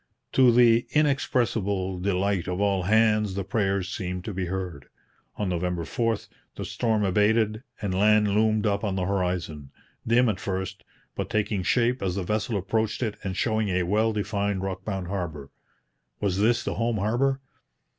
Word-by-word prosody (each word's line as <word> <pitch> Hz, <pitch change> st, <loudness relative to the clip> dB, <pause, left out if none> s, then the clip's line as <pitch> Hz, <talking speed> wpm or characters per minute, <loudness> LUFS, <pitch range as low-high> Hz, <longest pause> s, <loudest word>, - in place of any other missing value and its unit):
To 130 Hz, -2 st, +6 dB
the 120 Hz, -1 st, +5 dB
inexpressible 110 Hz, -10 st, +1 dB
delight 95 Hz, -1 st, 0 dB
of 90 Hz, +1 st, -2 dB
all 100 Hz, -2 st, +2 dB
hands 105 Hz, 0 st, +3 dB
the 100 Hz, -, -2 dB
prayers 95 Hz, -2 st, 0 dB
seemed 90 Hz, -2 st, -4 dB
to 105 Hz, -, -4 dB
be 95 Hz, -1 st, -2 dB
heard. 90 Hz, -6 st, -5 dB, 0.5 s
On 105 Hz, -, -2 dB
November 90 Hz, -1 st, -1 dB
4 115 Hz, +2 st, 0 dB, 0.4 s
the -, -, -5 dB
storm 110 Hz, -3 st, 0 dB
abated, 105 Hz, +3 st, +2 dB, 0.2 s
and 100 Hz, -2 st, -1 dB
land 105 Hz, +2 st, +4 dB
loomed 110 Hz, +1 st, +2 dB
up 100 Hz, 0 st, 0 dB
on 100 Hz, -3 st, -1 dB
the 95 Hz, -1 st, -1 dB
horizon, 90 Hz, -7 st, -2 dB, 0.4 s
dim 120 Hz, +2 st, +4 dB
at 110 Hz, -, 0 dB
first, 95 Hz, 0 st, -4 dB, 0.3 s
but -, -, -4 dB
taking 105 Hz, -2 st, 0 dB
shape 120 Hz, +5 st, +1 dB
as 95 Hz, -2 st, -1 dB
the 100 Hz, -, -2 dB
vessel 105 Hz, +3 st, -1 dB
approached 110 Hz, +5 st, -1 dB
it 110 Hz, -3 st, -2 dB
and 95 Hz, -1 st, -3 dB
showing 110 Hz, -1 st, +1 dB
a 90 Hz, -1 st, +1 dB
well 105 Hz, +5 st, +2 dB
defined, 100 Hz, -2 st, -1 dB
rock 95 Hz, -1 st, -4 dB
bound 95 Hz, -4 st, -3 dB
harbour. 85 Hz, -7 st, -5 dB, 0.7 s
Was 100 Hz, -2 st, 0 dB
this 115 Hz, +3 st, +3 dB
the -, -, -2 dB
home 115 Hz, -1 st, 0 dB
harbour? 120 Hz, +7 st, +1 dB
100 Hz, 165 wpm, -26 LUFS, 95-110 Hz, 0.7 s, To